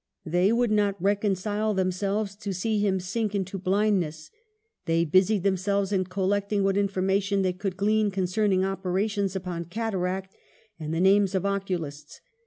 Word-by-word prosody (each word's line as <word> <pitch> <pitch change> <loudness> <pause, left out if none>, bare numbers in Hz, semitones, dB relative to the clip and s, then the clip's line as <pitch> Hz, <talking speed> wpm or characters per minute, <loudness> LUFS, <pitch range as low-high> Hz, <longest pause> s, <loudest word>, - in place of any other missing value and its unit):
They 180 +5 +2
would 235 -1 +2
not 205 -2 +1
reconcile 205 +2 0
themselves 195 +2 -1
to 200 -2 -4
see 215 +4 0
him 195 -2 +1
sink 210 +3 -2
into 195 0 -3
blind 200 +2 +2
ness. 155 -2 -6 0.6
They 165 +1 +2
busied 185 +4 +3
themselves 200 +1 0
in 190 -2 +1
collecting 200 +2 0
what 195 0 +2
information 195 0 +1
they 185 -1 +1
could 190 0 -4
glean 210 +1 +2
concerning 190 0 +1
opera 190 +1 -1
tions 200 -2 -2
upon 180 -2 -4
cataract, 190 -1 -3 0.4
and 155 -1 -4
the 165 - -1
names 195 0 +4
of 190 - 0
oculists. 175 -7 -3
195 Hz, 155 wpm, -26 LUFS, 185-205 Hz, 0.6 s, names